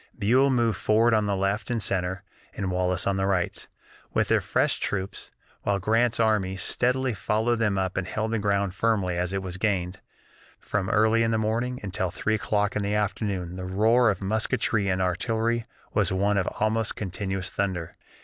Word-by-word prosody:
Buell 125 +6 +3
moved 120 -6 +1
forward 115 +2 +3
on 105 -1 +2
the 100 - +1
left 100 +2 -1
and 120 -2 0
center, 95 -2 -1 0.3
and 95 -2 -2
Wallace 90 0 0
on 100 -1 +1
the 95 0 0
right, 95 -3 -1 0.5
with - - +2
their - - +3
fresh - - +1
troops, 95 -1 -4 0.3
while 100 - 0
Grant's 115 +4 +1
army 105 -4 +1
steadily 125 +5 +1
followed 110 +4 0
them 105 -3 +1
up 95 -1 -1
and 95 -1 -1
held 110 +3 -2
the 115 - 0
ground 100 -2 0
firmly 100 -4 +1
as 90 +1 -1
it 95 0 -2
was 95 0 -5
gained. 95 -3 -1 0.6
From 95 -2 -2
early 110 +2 +3
in 115 - +2
the 110 - +1
morning 115 +4 -1
until 95 -2 -1
three 110 +5 -1
o'clock 105 -2 0
in 105 - 0
the 100 +1 -1
afternoon 100 -4 -2
the 95 - -5
roar 110 +6 +3
of 100 -1 -2
musketry 110 0 0
and 95 -1 +1
artillery 115 +5 0 0.3
was 100 -4 +2
one 100 +2 +2
almost 110 +4 -1
continuous 95 -1 -4
thunder. 90 -5 -2
100 Hz, 180 wpm, -26 LUFS, 95-110 Hz, 0.6 s, Buell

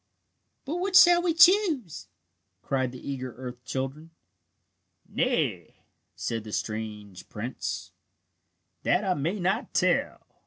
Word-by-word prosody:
"But 305 +5 -3
which 375 +1 +3
shall 350 -1 +7
we 345 -2 0
choose?" 330 - +4 0.6
cried 130 -2 -1
the 130 - -11
eager 130 -3 -5
earth 125 -1 -8
children. 135 +6 -5 1.0
"Nay," - - -1 0.4
said 115 -2 -3
the 110 - -9
strange 105 -3 -5
prince, 120 +5 -5 0.9
"that 180 - +1
I 190 -2 +1
may 175 +6 -2
not 190 +8 -1
tell. - - +1
145 Hz, 115 wpm, -27 LUFS, -, 1.0 s, shall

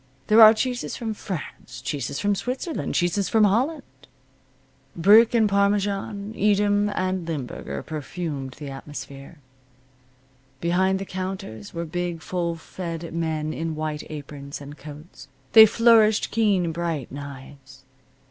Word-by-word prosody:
There 215 +2 +6
are 215 -1 +11
cheeses 250 +2 -2
from 225 -3 -4
France, 160 -9 -7
cheeses 135 +1 -4
from 205 0 +1
Switzerland, 250 - -3
cheeses 175 +3 +1
from 220 -1 +4
Holland. 260 +9 +2 1.1
Brick 215 +7 +6
and 220 -2 +4
parmesan, 200 +1 0
Edam 205 0 +2
and 185 -3 -2
limburger 125 - -5
perfumed 150 -3 -5
the 145 -2 -8
atmosphere. 140 +2 -9 1.2
Behind 185 +4 +1
the 195 - -5
counters 185 - -6
were 170 0 -3
big, 175 0 -4
full 170 -2 -2
fed 165 0 -7
men 160 -2 -2
in 160 0 -3
white 155 -1 -3
aprons, 145 -2 -8
and 145 +1 -10
coats. 150 -2 -12 0.2
They 220 -1 +10
flourished 225 -1 +4
keen 200 -6 +2
bright 165 -5 -3
knives. 135 -1 -10
175 Hz, 125 wpm, -24 LUFS, 150-205 Hz, 1.2 s, are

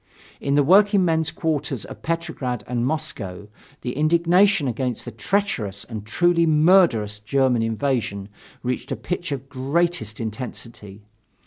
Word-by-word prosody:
In 140 0 0
the 145 - +5
workingmen's 180 -2 +4
quarters 155 - -2
of - - -10
Petrograd 160 -8 -3
and 120 0 -1
Moscow, 110 - -4 0.3
the 125 - -4
indignation 170 +3 +3
against 125 0 -2
the 120 - -6
treacherous 115 - -2
and 110 -3 -8
truly 170 +6 +3
murderous 155 - +4
German 125 +2 +1
invasion 115 -3 -1 0.4
reached 125 0 -3
a - - 0
pitch 175 -2 -4
of 135 -1 -4
greatest 135 -4 -1
intensity. 110 -2 -7
135 Hz, 125 wpm, -23 LUFS, 115-165 Hz, 0.4 s, the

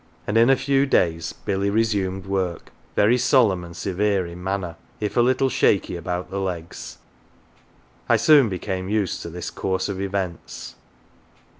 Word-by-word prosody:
And 105 - -2
in 115 +2 +6
a 135 - +6
few 135 +1 +1
days 85 -8 +1
Billy 100 +1 -2
resumed 100 -3 0
work, 95 -3 -2 0.2
very 115 +5 +4
solemn 110 -10 +3
and 85 0 -10
severe 100 +1 0
in 85 +1 -9
manner, 95 -3 -2 0.2
1^ 105 -1 -3
a 120 - +5
little 130 +2 +3
shaky 100 -7 +2
about 90 +2 -4
the 100 - -2
legs. 90 -4 -5 1.1
I - - +5
soon 145 -7 +6
became 95 0 -4
used 105 -3 0
to - - -6
this 85 +1 -6
course 95 +1 -2
of 95 -1 -3
events. 95 -3 -4
95 Hz, 155 wpm, -23 LUFS, 90-110 Hz, 1.1 s, in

